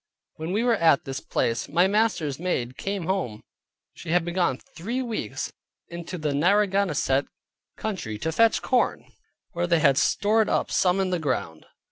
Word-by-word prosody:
When 160 +2 -4
we 210 +4 +1
were 240 -2 +3
at 160 -5 +4
this 135 0 -4
place, 115 0 -1
my 175 +5 +4
master's 190 -9 +1
maid 130 -9 -2
came 195 -3 -3
home; 175 - -2 0.5
she 170 - -10
had 170 0 +2
been 175 - -4
gone 175 -8 +1
three 235 - -5
weeks 230 -3 -4 0.4
into 170 +1 -6
the 155 -3 -1
Narragansett 180 -5 +2 0.5
country 180 - -4
to 160 +9 -2
fetch 230 +7 +3
corn, 250 -2 +1 0.5
where 175 0 -1
they 170 -1 +3
had 140 -3 +4
stored 215 +1 +2
up - - 0
some 180 +1 +2
in 190 -1 0
the 180 - 0
ground. 130 - -3
175 Hz, 165 wpm, -25 LUFS, 145-200 Hz, 0.5 s, at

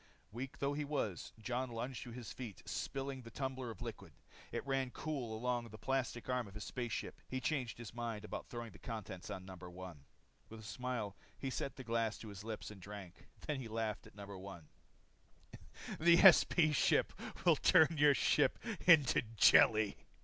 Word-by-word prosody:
Weak 130 +4 -6
though 140 +1 0
he 150 +1 -2
was 140 - -2
Jon 125 +3 -2
lunged 120 0 -4
to 120 - -8
his 120 -1 -7
feet, 120 -7 -8
spilling 135 -1 -3
the 115 - -10
tumbler 130 -1 -4
of 110 - -7
liquid. - - -7 0.4
It - - -3
ran 135 -1 0
cool 125 -6 -4
along 120 0 -1
the 110 - -10
plastic 130 -1 -2
arm 125 -3 0
of 100 - -13
his 105 - -5
space 120 -2 -4
suit. - - -3
He 130 - -2
changed 130 -4 -1
his 115 -2 -8
mind 115 -3 -4
about - - -6
throwing 120 -2 -6
the - - -15
contents 105 -6 -6
on 95 -1 -5
No. 95 0 -8
1. 90 -4 -9 0.5
With 110 - -9
a - - -11
smile 115 -2 -3 0.2
he 135 - -3
set 135 - -3
the 130 - -8
glass 115 -2 0
at - - -8
his 100 0 -8
lips 110 -1 -5
and 100 -2 -11
drank. 100 -2 -10 0.2
Then 150 -3 -1
he 125 - -5
laughed 110 -1 -3
at - - -18
No. 100 -1 -8
1. 95 -5 -10 1.3
"The 170 +1 +7
SP 170 -4 +7
ship - - +3 0.3
will - - +7
turn 160 +1 +5
your 145 -1 +7
ship - - +3 0.3
into 155 -7 +7
jelly." 110 -1 +5
120 Hz, 185 wpm, -37 LUFS, 105-135 Hz, 1.3 s, The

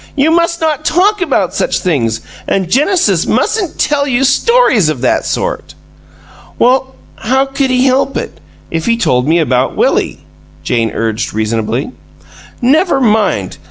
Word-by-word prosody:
"You 295 +2 +2
must 335 0 +1
not 310 -2 -1
talk 370 +6 +1
about 200 - 0
such - - -1
things, 115 -10 -1 0.3
and 190 -2 -1
Genesis 350 - +2
mustn't 400 -7 -1
tell, 285 -1 0
you 260 0 +1
stories 275 - +3
of 145 -6 -3
that 130 - 0
sort!" - - -3 0.8
"Well, 260 +1 +1 0.2
how 265 +4 +1
could 270 0 -2
he 255 0 +2
help 270 +1 +1
it, - - -6 0.3
if 165 -1 -3
he 230 0 +2
told 125 - +1
me 165 +2 +3
about 130 -5 0
Willie?" - - 0 0.4
Jane 115 -2 0
urged, 110 0 -3
reasonably. 110 - -2 0.7
"Never 290 +4 +3
mind! 220 -4 0
255 Hz, 145 wpm, -13 LUFS, -, 0.8 s, stories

